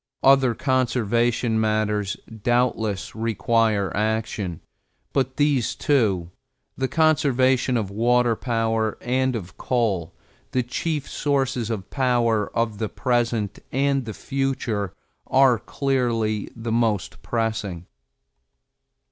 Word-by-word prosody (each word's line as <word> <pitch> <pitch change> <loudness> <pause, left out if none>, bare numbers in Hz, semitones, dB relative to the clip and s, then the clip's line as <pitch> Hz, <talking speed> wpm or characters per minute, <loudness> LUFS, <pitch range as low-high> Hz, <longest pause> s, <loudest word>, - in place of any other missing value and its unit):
Other 135 -3 +5
conservation 120 -3 +1
matters 105 -2 0 0.2
doubtless 115 -4 0
require 110 -2 +1
action, 110 -4 -2 0.5
but 130 -1 0
these 145 -5 +2
two, 100 - +1 0.4
the 130 - -1
conservation 130 -5 +2
of 105 -4 -2
water 120 +2 +2
power 115 -2 0
and 130 +1 0
of 95 -5 -7
coal, 100 -9 -1 0.4
the 125 - +2
chief 145 +4 -2
sources 135 -5 -1
of 105 -4 -4
power 120 -5 +1
of 115 -3 0
the 110 -2 -1
present 120 -4 -1
and 135 0 +1
the 110 - -6
future, 130 -8 -2 0.3
are 130 -3 +4
clearly 115 -7 -1
the 115 0 -4
most 110 -4 0
pressing. 110 -7 -2
115 Hz, 105 wpm, -23 LUFS, 110-130 Hz, 0.5 s, Other